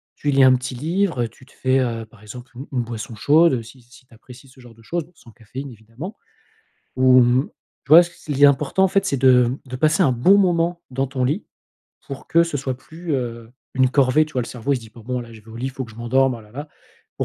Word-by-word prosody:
Tu 145 - -3
lis 135 -1 +4
un 130 0 +7
petit 125 0 -5
livre 165 0 -1
et 115 - -3
tu 125 +3 -20
te - - -23
fais, 130 +1 +1
heu, 115 -3 -2
par 110 -1 -21
exemple, 120 +4 -11
une 135 +4 -9
une 125 -3 -1
boisson 115 -1 -7
chaude 145 - +3
si 120 +3 -15
si 125 +2 -20
tu 125 - -23
apprécies 125 +4 -15
ce 130 - -20
genre 120 -2 -15
de 115 - -20
chose, 170 +5 -3
bon 175 - -26
sans 120 - -18
caféine, 130 +5 -9
évidemment. 115 - -10 0.8
Ou 130 0 +6
mmh, 125 +3 +2 0.4
tu - - -26
vois, 165 +4 +9
ce 175 - -9 0.2
il 140 0 -2
est - - +10
important, 145 +6 +2
en 190 - +5
fait, 195 +1 +1
c'est 140 - -1
de 125 -2 +5
mmh, 125 +3 -4
de - - -3
passer 155 +7 +2
un 135 - +3
bon 180 +12 +4
moment 175 -2 +1
dans 135 +1 -1
ton 130 -1 -3
lit 150 +11 -2 0.6
pour 140 -1 -8
que 170 - +4
ce 170 -3 -4
soit 130 -1 -3
plus, 160 +4 -8
heu, 115 -3 -5 0.2
une 130 0 +3
corvée, 140 +2 +3
tu 155 - -16
vois. 125 - 0
Le - - -7
cerveau, 125 +4 -3
il - - 0
se - - -7
dit 110 - -14
pas: 115 - -15
«Bon, 125 +1 -3
là, 120 -1 -11
je 110 - -13
vais 110 - -21
au 110 - -10
lit, 125 +3 -4
il - - -3
faut 130 0 -6
que 115 - -14
je - - -17
m'endorme, 130 +3 +1
ah 115 - -13
là, 105 0 -19
là». 145 +4 -7 0.5
Il - - +2
130 Hz, 280 wpm, -21 LUFS, 120-150 Hz, 0.8 s, est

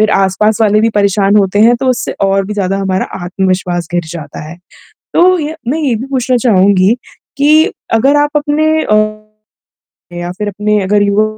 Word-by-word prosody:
फिर 215 0 +2
आस-पास 205 +3 +1
वाले 215 -1 +3
भी 225 - +2
परेशान 200 0 +2
होते 200 0 +1
हैं 235 +3 +5
तो 265 - -1
उससे 250 - -3
और 195 0 +1
भी 210 - -5
ज़्यादा 195 -1 -1
हमारा 190 -1 -1 0.2
आत्मविश्वास 180 -2 -2
गिर 175 -1 -1
जाता 155 -4 -8
है। 170 - -10 0.6
तो 365 +1 +4
ये 310 +1 -4
मैं 300 +6 -1
ये 270 -7 0
भी 240 +5 -5
पूछना 255 -1 0
चहूँगी, 200 -1 +3 0.4
कि 305 +3 +4 0.3
अगर 270 +6 +3
आप 290 0 +2
अपने 295 +1 0 0.2
अ, 215 - +1 1.2
या 175 0 -5
फिर 210 +3 -5
अपने 210 +1 -1
अगर 205 +2 +1
युवा 200 +1 +2
210 Hz, 180 wpm, -12 LUFS, 190-245 Hz, 1.2 s, हैं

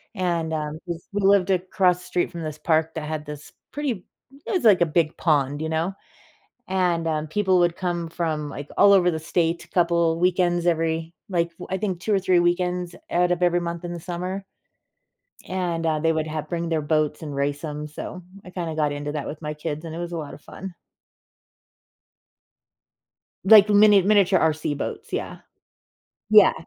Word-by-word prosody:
and, 170 -4 -1
um, 155 0 -3
jus 170 -1 -6
we 205 0 -2
lived 195 -1 +4
across 180 -1 +2
the 180 - -13
street 175 - -1
from 170 - -7
this 155 -1 -5
park 160 0 +1
that 155 -2 -4
had 155 -1 -4
this 150 0 -9 0.2
pretty 260 -10 -3 0.4
it - - -4
was 370 -4 0
like 210 -5 +6
a - - +6
big 160 0 +1
pond, 145 -3 +1
you 160 - -2
know? 165 +4 -1 0.7
And, 180 -3 0
um, 155 -1 -1
people 190 +2 +2
would 175 -1 +2
come 175 -2 -2
from, 155 -3 -2
like, 145 0 -7
all 200 - +7
over 180 -2 +5
the 160 -2 -2
state 170 +1 -1
a - - -28
couple 170 -2 +2
weekends 175 -1 +2
every 165 -1 0 0.2
like, 170 -2 0 0.2
I 190 - -1
think 190 -3 -2
2 215 - -1
or 195 - +3
3 185 -1 +3
weekends 180 0 0 0.2
out 180 0 +2
of 180 - 0
every 175 0 +3
month 170 0 -5
in 175 - -4
the 170 - -6
summer. 180 +3 -4 1.1
And, 175 -3 -2
uh, 155 -1 +1
they 165 +1 +2
would 155 -1 -1
have 155 -1 -4
bring 170 0 -2
their 160 -2 0
boats 155 0 0
and 150 -2 -6
race 140 +1 -1
'em, 150 -1 -4
so, 180 +4 -7 0.2
I 180 - -10
kinda 170 -3 -4
got 150 -2 +1
into 145 0 -4
that 150 -2 -4
with 150 - -6
my 150 0 -4
kids, 150 +1 -5
and 160 - -6
it - - -5
was 175 0 -5
a 170 - -3
lot 150 -2 -6
of - - -14
fun. 190 -2 -9 2.7
Like 210 +1 +8
mini 205 -1 +6
miniature 195 -1 +4
RC 155 -2 0
boats, - - -6
yeah - - -4 0.9
Yeah - - +7
170 Hz, 195 wpm, -24 LUFS, 155-180 Hz, 2.7 s, Like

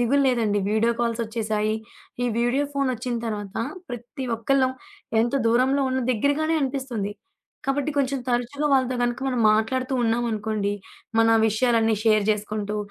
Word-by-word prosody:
దిగులు 270 +4 +3
లేదండి 225 -5 +1
video 225 +2 +2
calls 235 -1 0
ఒచ్చేసాయి. 215 -1 -1 0.5
ఈ - - +2
వీడియో 245 +4 +2
ఫోను 275 -2 +1
ఒచ్చిన 245 +1 -3
తర్వాత 205 -3 -5 0.3
ప్రతి 245 +3 -6
ఒక్కళ్ళం 260 +3 +2 0.5
ఎంత 235 - -1 0.2
దూరంలో 260 +4 +3
ఉన్న 260 0 0
దెగ్గరగానే 285 +7 +1
అనిపిస్తుంది. 260 -7 -2 0.5
కాబట్టి 280 +2 0
కొంచెం 275 0 +1
తరచుగా 245 +5 0
వాళ్ళతో 260 -2 +2
గనుక 240 +1 -1
మనం 250 -3 0
మాట్లాడుతూ 255 +5 0
ఉన్నామనుకోండి. 220 -3 0 0.5
మన 225 0 +5 0.2
విషయాలన్నీ 225 0 +2
షేర్ 215 -2 +4
జేసుకుంటూ, 210 0 -2
240 Hz, 135 wpm, -24 LUFS, 220-260 Hz, 0.5 s, మన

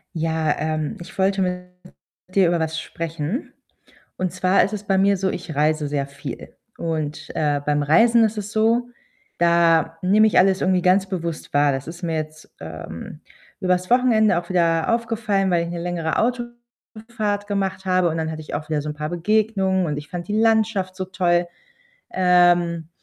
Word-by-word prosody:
Ja, 160 -1 0
ähm, 155 -1 -2
ich 175 - -11
wollte 195 0 +2
mit 180 0 -2 0.6
dir 190 -2 +4
über 170 0 +1
was 160 0 -2
sprechen. 165 - -5 0.6
Und 185 -1 -1
zwar 185 +1 +3
ist 200 - -2
es 210 -1 -4
bei 195 -1 +1
mir 200 +1 +3
so, 190 +1 0
ich 160 -4 -6
reise 150 +1 +1
sehr 140 -1 -2
viel. 140 -2 -9 0.2
Und, 155 -3 -4
äh, 145 -2 0
beim 145 0 +1
Reisen 230 +10 +5
ist 220 0 0
es 205 0 -5
so, 230 +3 +1 0.5
da 170 -2 +3
nehme 210 +4 +4
ich 215 - +3
alles 190 0 +3
irgendwie 185 -1 +2
ganz 185 +2 +3
bewusst 170 -4 -5
wahr. 145 0 +4
Das 135 0 -4
ist 170 +3 -9
mir 165 -2 -1
jetzt, 155 0 -6
ähm, 85 - -8 0.4
übers 185 -1 0
Wochenende 230 -6 +4
auch 175 - -12
wieder 170 +1 +2
aufgefallen, 215 -4 0
weil 170 -1 +2
ich 170 - -5
'ne 175 - -4
längere 170 -2 -2
Autofahrt 235 -3 -4
gemacht 195 -2 -2
habe 185 -2 +2
und 160 - -3
dann 160 0 -2
hatte 155 0 -6
ich 155 - -10
auch 150 +1 -5
wieder 155 -2 0
so 150 - -5
'n 150 - -5
paar 150 0 -4
Begegnungen 190 +1 +1
und 150 -3 -2
ich 150 0 -8
fand 175 -1 -6
die 210 +1 0
Landschaft 220 -4 +1
so 185 0 -4
toll. 175 -2 +1 0.6
Ähm, 175 -2 +3
180 Hz, 180 wpm, -22 LUFS, 160-200 Hz, 0.6 s, Reisen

